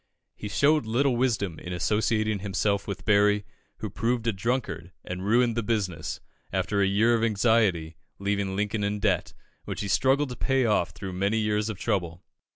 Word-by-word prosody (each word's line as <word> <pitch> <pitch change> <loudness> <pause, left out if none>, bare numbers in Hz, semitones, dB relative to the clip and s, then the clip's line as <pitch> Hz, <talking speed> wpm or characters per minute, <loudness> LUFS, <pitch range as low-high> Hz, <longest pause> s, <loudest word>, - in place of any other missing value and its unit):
He 105 - -6
showed 145 +1 +3
little 125 +3 +2
wisdom 110 -9 0
in 90 - -6
associating 110 +3 +1
himself 100 0 -1
with 100 0 -5
Berry, 105 0 +3 0.3
who - - -5
proved 120 0 -1
a 115 - +1
drunkard, 95 -5 -2
and 90 +1 -5
ruined 115 +3 +3
the 115 - 0
business, 100 -8 -2 0.3
after 95 +2 0
a 100 - +4
year 110 +4 +3
of 115 -1 +1
anxiety, 105 -7 +2 0.2
leaving 100 -1 -1
Lincoln 105 +1 -1
in 100 +1 -1
debt, - - 0 0.3
which - - -4
he 100 - -3
struggled 135 +7 +2
to 125 - -6
pay 135 +1 +1
off 105 -6 +2
through 95 +1 -7
many 100 +4 0
years 105 0 0
of 110 - -4
trouble. 90 -3 -2
105 Hz, 175 wpm, -27 LUFS, 95-115 Hz, 0.3 s, a